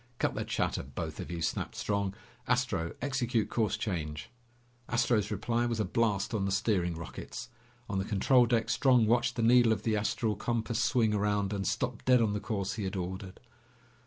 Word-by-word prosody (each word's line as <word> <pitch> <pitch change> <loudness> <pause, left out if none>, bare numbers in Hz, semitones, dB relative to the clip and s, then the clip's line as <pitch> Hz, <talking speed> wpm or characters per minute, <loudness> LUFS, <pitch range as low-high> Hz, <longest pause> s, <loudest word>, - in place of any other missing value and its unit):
"Cut - - 0
the - - -2
chatter, - - -1
both 65 0 -6
of - - -6
you!" 85 -2 -4
snapped - - -2
Strong. 100 -1 -1 0.3
"Astro, 115 -9 0
execute 120 -6 0
course 110 -3 +1
change!" 75 -5 -4 0.6
Astro's 120 -3 +2
reply 115 +3 0
was 115 -2 -2
a 110 - +1
blast 105 +1 0
on 100 -3 0
the 100 - -1
steering 95 -4 +1
rockets. 85 0 -7 0.4
On 100 -1 -1
the - - 0
control 120 +5 +3
deck, 115 0 +1
Strong 125 -3 +4
watched 120 +1 +2
the 115 - -1
needle 120 0 +6
of 105 -2 0
the 110 -1 +1
astral 105 +1 0
compass 115 +2 -1
swing 115 -6 +2
around 105 -1 0
and 95 -3 -2
stop - - -2
dead 125 -1 +5
on 110 -3 +2
the 105 - -1
course 100 -3 -2
he 105 - -2
had 95 - -3
ordered. 95 +1 -5
110 Hz, 190 wpm, -30 LUFS, 95-120 Hz, 0.6 s, needle